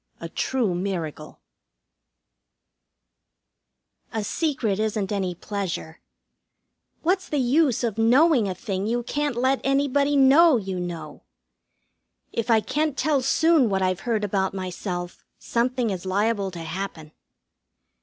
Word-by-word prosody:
XII - - -7
A - - -6
TRUE 235 0 -1
MIRACLE 170 -5 -4 2.7
A 220 -1 -2
secret 230 - -1
isn't 215 -2 -1
any 190 -3 -1
pleasure. 185 -5 -5 1.0
What's 370 +3 0
the 295 - -1
use 265 0 +2
of 225 -2 -2
knowing 250 +1 +4
a 185 - -3
thing 195 +1 -3
you 240 +2 -1
can't 290 +1 -2
let 260 +2 +1
anybody 280 +1 +2
know 280 +2 +6
you 190 -4 -4
know? 170 -3 -6 1.1
If 230 +1 -2
I 225 -1 +5
can't 295 +3 -1
tell 285 -1 +2
soon 295 0 +3
what 190 -1 0
I've 185 0 0
heard 225 -2 -1
about 195 -1 -1
myself 180 -1 -5
something 240 -1 -1
is 185 -2 -4
liable 200 +1 0
to 175 -2 -8
happen. 165 -2 -6
220 Hz, 125 wpm, -24 LUFS, 190-270 Hz, 2.7 s, know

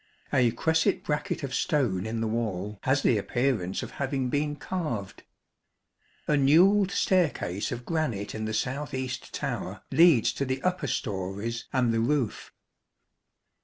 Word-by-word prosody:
A 125 -2 +4
cresset 160 +6 +1
bracket 150 0 -2
of 135 -2 -4
stone 115 - 0
in 115 0 -3
the 115 - 0
wall 105 -3 -3
has 135 +2 +2
the 110 - +3
appearance 110 -5 -1
of - - -7
having 135 -2 -2
been 145 0 0
carved. 135 - -4 1.1
A - - +1
newelled 180 +8 +5
staircase 160 - 0
of 120 -1 -5
granite 150 - -2
in 110 0 -4
the 110 - -3
south 135 +5 -2
east 130 -1 -4
tower - - -4
leads 160 -6 +5
to - - -2
the 130 0 -2
upper 185 0 0
storeys 100 +3 -3
and 125 -3 +2
the 115 - +1
roof. 120 -1 -1
130 Hz, 145 wpm, -27 LUFS, 110-150 Hz, 1.1 s, newelled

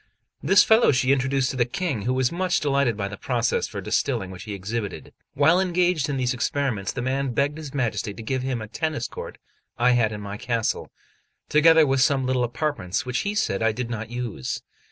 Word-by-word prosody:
This 195 - +6
fellow 225 +2 +5
she 130 -1 +2
introduced 135 0 +1
to 130 - -6
the 120 - +4
King, 135 - -3
who - - +2
was 130 -1 +1
much 180 -1 0
delighted 140 -6 +1
by 100 -2 -2
the 100 +1 -7
processes 120 -1 0
for - - -5
distilling 95 -1 -1
which 95 +4 -9
he 105 -2 -5
exhibited. 105 +2 -5 0.2
While 160 +6 +4
engaged 180 -5 +1
in 140 - -1
these 125 -1 0
experiments, 125 -5 -1
the 125 - -4
man 135 0 -1
begged 145 +2 0
his 150 -3 -7
Majesty 120 -6 -1
to 115 - -8
give 130 +3 -1
him 125 -3 -2
a - - -8
tennis 155 0 -2
court - - -8 0.4
I 125 +1 +4
had 120 -3 +2
in 105 - -5
my 100 0 -6
castle, 115 -1 -2 0.6
together 160 +1 +6
with 135 -1 +1
some 135 -1 +3
little 130 -1 +1
apartments 120 - -2
which 125 0 -1
he 205 +1 -2
said 100 - 0
I 110 0 +2
did 120 +1 -4
not 115 -1 -4
use. 120 - -4
130 Hz, 210 wpm, -24 LUFS, 115-145 Hz, 0.6 s, This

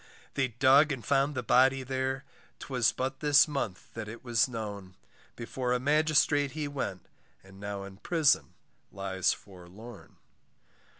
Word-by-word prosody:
They 135 -2 +1
dug 135 +5 +4
and 130 -4 -5
found 140 +1 +1
the 125 - -2
body 130 +3 +4
there, 130 +1 -2 0.3
'Twas 125 -4 0
but 130 +1 -4
this 145 +1 +5
month 135 -11 -5
that 110 -1 -6
it 115 +2 -9
was 120 -2 +2
known. 100 -6 -7 0.4
Before 125 +1 -3
a 125 - +1
magistrate 145 0 +2
he 150 -1 -3
went, 135 -10 -5 0.4
And 95 0 -16
now 100 -1 -5
in 100 -1 -11
prison 160 - +1 0.4
lies 95 -1 0
forlorn. 100 +4 -11
125 Hz, 140 wpm, -29 LUFS, 105-140 Hz, 0.4 s, this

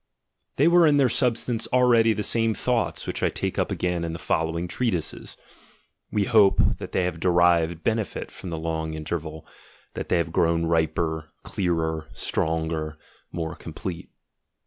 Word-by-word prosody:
They - - +4
were 170 -1 +6
in 145 -1 +4
their 135 -3 +4
substance 120 -1 +1
already 120 -3 +5
the 105 -1 -1
same 115 -1 +1
thoughts 125 -2 -1
which - - -4
I - - +2
take - - -3
up - - 0
again 90 -1 -1
in 85 -1 -3
the - - -4
following 80 +2 -1
treatises: 95 -5 -3 0.4
— - - -40
we 105 - +1
hope 105 -4 +4 0.2
that - - -7
they 95 - +1
have 90 -2 -2
derived 85 -2 +3
benefit 110 -3 -2
from 95 - -9
the 80 - -4
long 80 -1 -3
interval, 80 0 -5 0.5
that - - -6
they 90 - +3
have 85 -1 -1
grown 85 0 +2
riper, 80 -1 0
clearer, 80 -3 -1
stronger, 80 -1 -2 0.3
more 80 -2 -4
com - - -10
plete. 90 -3 -6
85 Hz, 165 wpm, -25 LUFS, 80-110 Hz, 0.5 s, were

